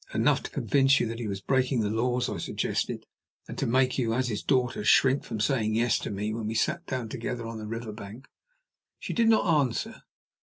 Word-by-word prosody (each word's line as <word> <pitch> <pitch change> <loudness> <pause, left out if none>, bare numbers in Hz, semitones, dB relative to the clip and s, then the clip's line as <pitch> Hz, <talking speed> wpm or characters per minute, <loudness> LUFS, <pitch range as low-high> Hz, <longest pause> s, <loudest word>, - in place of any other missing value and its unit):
"Enough - - +3
to - - -6
convince 135 -1 +3
you - - +1
that 115 +1 -5
he 115 - -3
was 100 -1 -4
breaking 130 +1 +1
the 105 - 0
laws," 125 +2 0
I 100 - -4
suggested; - - -2 0.4
"and, - - -7
to - - 0
make 130 +2 +2
you, 115 -2 +1
as 130 0 0
his 105 -2 -2
daughter, 125 -5 0
shrink 130 +5 +4
from 110 - -5
saying 110 -3 +1
'yes' 120 +1 +2
to - - -5
me 105 +1 -3
when 110 -1 -3
we 110 - -3
sat 170 +8 0
together 120 -1 -4
on 115 -1 -6
the 105 - -6
river 115 0 -5
bank?" 105 +5 -10 0.7
She - - -5
did 230 -1 +3
not 220 -2 +4
answer. 145 - 0
120 Hz, 215 wpm, -27 LUFS, 110-130 Hz, 0.7 s, shrink